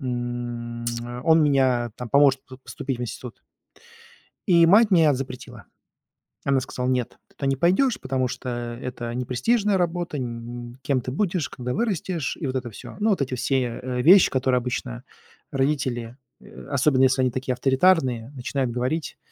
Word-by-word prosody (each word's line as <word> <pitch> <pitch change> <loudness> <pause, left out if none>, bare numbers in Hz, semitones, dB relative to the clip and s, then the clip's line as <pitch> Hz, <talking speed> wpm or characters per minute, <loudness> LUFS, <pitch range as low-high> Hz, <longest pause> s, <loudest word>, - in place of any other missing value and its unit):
м, 120 -2 -4 0.4
он 160 0 +5
мня 130 -5 +2
там 125 -1 -6
поможет 140 0 +4
п 130 - -11
поступить 135 -2 -4
в - - -4
институт. 120 +1 -7 1.1
И 170 -3 +6
мать 210 +4 +6
мне 165 -5 +5
а - - +2
запретила. 125 -2 -7 0.8
Она 135 -1 +3
сказала: 130 -2 -4
"Нет, 125 -2 -1
ты - - -29
туда 140 - -3
не 135 - +2
пойдёшь, 190 - +2
потому 130 -1 -1
что 125 - -6 0.3
это 120 -2 -5
непрестижная 195 - +1
работа". 175 -2 -1
Н 120 -1 -6
кем 135 -3 +1
ты 125 - -5
будешь, 175 0 -1
когда 125 0 -5
вырастешь? 185 - -2
И 155 - -4
вот 130 0 -3
это 125 -2 -3
всё. 105 - -11
Ну, 220 +2 +2
вот 190 - 0
эти 130 -2 -2
все, 125 -2 -1
э, 125 -1 -2
вещи, 185 +5 +7
которые 130 -1 +1
обычно 125 -1 -4 0.5
родители, 130 -4 -1 0.2
э, - - -13
особенно 140 -1 +3
если 130 0 +3
они 125 - +1
такие 130 +1 -2
авторитарные, 130 -2 +2
начинают 130 0 -2
говорить, 130 +7 -2
130 Hz, 165 wpm, -24 LUFS, 125-150 Hz, 1.1 s, вещи